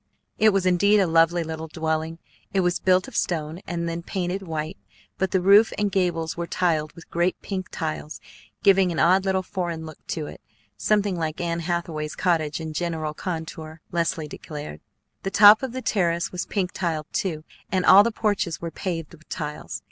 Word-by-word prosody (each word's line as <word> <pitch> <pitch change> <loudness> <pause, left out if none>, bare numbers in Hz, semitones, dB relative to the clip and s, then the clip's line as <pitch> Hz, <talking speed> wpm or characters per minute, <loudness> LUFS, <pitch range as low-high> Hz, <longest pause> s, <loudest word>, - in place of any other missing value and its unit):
It 220 - +6
was 195 -2 +1
indeed 200 +4 +4
a 195 - +4
lovely 165 +1 +3
little 160 0 -5
dwelling. 160 0 -2 0.4
It 190 - +4
was 175 -1 +1
built 185 0 +3
of - - -11
stone, 160 -1 -1
and 170 -1 -2
then 170 0 -3
painted 180 +2 -3
white, 160 -3 -4 0.4
but 190 +1 +1
the 190 0 +1
roof 200 +4 +6
and 205 -1 0
gables 175 -4 0
were 170 0 -4
tiled 160 -5 0
with 170 - -15
great 175 +2 +1
pink 185 -2 -4
tiles, 155 -1 -4 0.4
giving 195 -2 +5
an 165 - -4
odd 185 +4 +4
little 190 -1 +1
foreign 175 -4 -4
look 155 -1 -10
to 155 -3 -3
it, - - -10 0.3
something 205 - +1
like 160 -2 -3
Anne 170 -1 -1
Hathaway's 165 -3 -3
cottage 160 -5 0
in 160 -1 -5
general 160 -2 -2
contour, 160 -2 -6
Leslie 165 -2 -1
declared. 150 - -8 0.4
The 195 - -2
top 205 +2 +8
of 265 -2 -3
the 260 +1 -5
terrace 170 -4 0
was 180 0 -4
pink 190 -3 -1
tiled, 165 -4 -2
too, 160 -5 -2 0.3
and 185 -1 +1
all 195 - +9
the 235 +3 +1
porches 205 -7 -1
were 170 -1 -5
paved 165 -5 -4
with 155 -2 -18
tiles. 150 -7 -5
170 Hz, 185 wpm, -24 LUFS, 160-190 Hz, 0.4 s, all